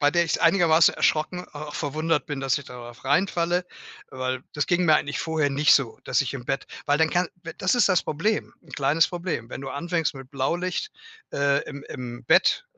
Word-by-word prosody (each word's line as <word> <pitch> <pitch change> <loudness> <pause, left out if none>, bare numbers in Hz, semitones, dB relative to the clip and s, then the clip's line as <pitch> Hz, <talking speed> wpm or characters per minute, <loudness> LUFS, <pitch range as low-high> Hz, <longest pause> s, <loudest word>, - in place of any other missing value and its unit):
bei 145 0 +4
der 170 +1 +3
ich's 165 - 0
einigermaßen 165 -1 +5
erschrocken 180 +4 0
auch 150 0 -8
verwundert 155 +1 -1
bin, 145 -2 -4
dass 135 -3 +1
ich 140 - -10
darauf 120 0 -11
reinfalle, 175 +4 +1 0.5
weil 130 0 -3
das 145 - -1
ging 180 0 +2
mir 155 -2 +6
eigentlich 145 - -2
vorher 160 -3 0
nicht 145 +2 +4
so, 130 -5 0
dass - - +1
ich 140 0 -2
im 125 - -6
Bett 135 +2 -2 0.2
weil 145 +1 +2
dann 160 - +4
kann 175 -1 +1 0.3
das 185 +5 +2
ist 240 - +4
das 185 -2 +3
Problem 205 +9 -1
'n - - -17
kleines 150 +3 +3
Problem. 175 -10 -4
Wenn - - -7
du 135 - -6
anfängst 165 +3 -1
mit 135 -1 -10
Blaulicht, 175 - -2 0.4
äh, 140 0 +2
im 140 +1 -8
im 120 -2 -8
Bett - - +4
150 Hz, 200 wpm, -25 LUFS, 135-170 Hz, 0.5 s, mir